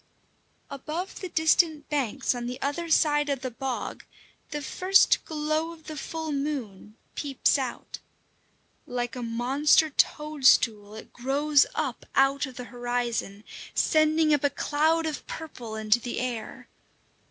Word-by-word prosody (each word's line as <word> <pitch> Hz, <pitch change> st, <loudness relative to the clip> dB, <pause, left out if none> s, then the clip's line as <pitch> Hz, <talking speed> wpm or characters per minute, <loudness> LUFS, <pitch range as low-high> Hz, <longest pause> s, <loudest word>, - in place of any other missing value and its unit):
Above 310 Hz, +7 st, -5 dB
the 370 Hz, -, -6 dB
distant 315 Hz, -1 st, +2 dB
banks 275 Hz, -3 st, 0 dB
on 240 Hz, -1 st, -5 dB
the 250 Hz, +1 st, -5 dB
other 295 Hz, +5 st, -2 dB
side 295 Hz, -2 st, +3 dB
of 275 Hz, -2 st, -1 dB
the 255 Hz, -1 st, -4 dB
bog, 260 Hz, +2 st, -4 dB, 0.5 s
the 295 Hz, -, -4 dB
first 370 Hz, +7 st, +3 dB
glow 310 Hz, +1 st, -1 dB
of 320 Hz, -1 st, -16 dB
the 310 Hz, 0 st, -7 dB
full 320 Hz, +2 st, -5 dB
moon 255 Hz, -8 st, -4 dB, 0.2 s
peeps 280 Hz, -3 st, +1 dB
out. 260 Hz, -2 st, -5 dB, 0.9 s
Like 245 Hz, 0 st, -3 dB
a 250 Hz, -, -5 dB
monster 265 Hz, +7 st, +2 dB
toadstool, 260 Hz, -9 st, +2 dB
it 220 Hz, -, -11 dB
grows 280 Hz, +3 st, +2 dB
up 275 Hz, -6 st, -2 dB
out 270 Hz, +1 st, +3 dB
of 260 Hz, -, -11 dB
the 250 Hz, -, -6 dB
horizon, 240 Hz, -4 st, -2 dB, 0.3 s
sending 310 Hz, 0 st, +3 dB
up 290 Hz, -, +1 dB
a 285 Hz, -, +4 dB
cloud 315 Hz, +3 st, +1 dB
of 310 Hz, -2 st, -4 dB
purple 245 Hz, -9 st, -7 dB
into 215 Hz, +1 st, +2 dB
the 240 Hz, 0 st, -4 dB
air. 240 Hz, -3 st, -5 dB
280 Hz, 140 wpm, -27 LUFS, 245-310 Hz, 0.9 s, a